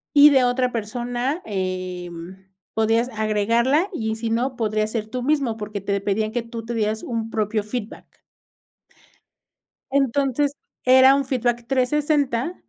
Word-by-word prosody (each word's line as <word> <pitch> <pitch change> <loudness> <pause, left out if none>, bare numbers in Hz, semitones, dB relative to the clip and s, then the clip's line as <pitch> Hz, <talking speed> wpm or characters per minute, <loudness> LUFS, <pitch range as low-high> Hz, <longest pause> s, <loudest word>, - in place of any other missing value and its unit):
Y 290 +1 +9
de 265 -2 +4
otra 250 0 +1
persona, 245 +6 -2
em, 185 -1 -5 0.3
podías 225 +2 +2
agregarla 230 - +1
y 220 -9 -2
si 225 0 -3
no, 245 +3 0
podrías 215 -1 0
ser 220 -2 -3
tú 245 +3 -5
mismo, 275 -5 +1
porque 210 -1 -5
te 200 +1 -1
pedían 215 +2 -1
que 240 0 -1
tú 230 -1 -8
te 235 +1 -4
dieras 220 0 -1
un 225 -2 -3
propio 215 -1 -1
feedback. 215 0 -7 1.7
Entonces, 275 +1 +1 0.3
era 260 +1 +7
un 280 0 +1
feedback 240 -2 -1
360, 280 +2 +1
230 Hz, 135 wpm, -22 LUFS, 215-260 Hz, 1.7 s, Y